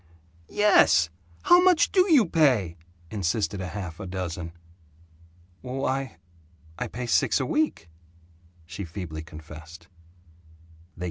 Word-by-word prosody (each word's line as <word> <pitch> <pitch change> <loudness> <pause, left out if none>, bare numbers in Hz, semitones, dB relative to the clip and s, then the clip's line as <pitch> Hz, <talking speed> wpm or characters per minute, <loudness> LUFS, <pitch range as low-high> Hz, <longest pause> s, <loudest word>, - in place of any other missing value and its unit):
"Yes! 90 - +4 0.3
How 350 +1 +6
much 360 -3 +4
do 370 -1 +3
you 270 -9 +6
pay?" 130 - +2 0.4
insisted 100 +1 -1
half 90 -2 -6
a 95 - -6
dozen. 90 -2 -5 1.1
"W 130 +1 -5
why, 135 0 -2 0.6
I - - -2
pay 125 +1 -6
six 120 - +2
a - - -1
week," 305 - -1 0.8
she 90 +4 -7
feebly 80 -3 -7
confessed. 80 +2 -12
95 Hz, 110 wpm, -26 LUFS, 85-135 Hz, 1.1 s, How